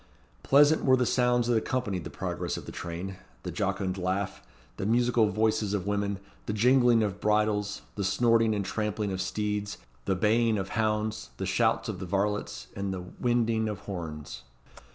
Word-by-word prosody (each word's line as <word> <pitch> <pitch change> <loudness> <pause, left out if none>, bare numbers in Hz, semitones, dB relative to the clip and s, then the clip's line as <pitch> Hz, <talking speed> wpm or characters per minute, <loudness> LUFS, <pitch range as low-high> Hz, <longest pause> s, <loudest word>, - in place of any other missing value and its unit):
Pleasant 145 +3 +5
were 130 -1 +5
the 125 - +2
sounds 125 0 +2
that 120 0 +2
accompanied 110 - -2
the - - -5
progress - - -3
of - - -8
the - - -7
train: 90 +3 -5 0.3
the - - -4
jocund 95 -1 -1
laugh, 95 +1 -2 0.4
the - - -3
musical 120 -1 +3
voices 110 0 +1
of 95 -3 -2
women, 100 -1 -1 0.3
the 105 - -1
jingling 120 +1 +4
of 100 -1 -3
bridles, 105 -1 +1
the 100 - -3
snorting 115 +3 +3
and 100 -2 -2
trampling 105 -1 -2
of 95 0 -2
steeds, 105 +2 -2 0.3
the 95 - +1
baying 110 +3 +3
of 95 -1 -3
hounds, 110 0 -1
the - - -3
shouts - - +1
of 95 - -4
the 95 - -5
varlets, 105 +2 -1
and 100 0 -2
the 95 -1 -4 0.2
winding 115 -2 +1
of 105 -2 -5
horns. 75 -9 -6
105 Hz, 175 wpm, -28 LUFS, 95-115 Hz, 0.4 s, Pleasant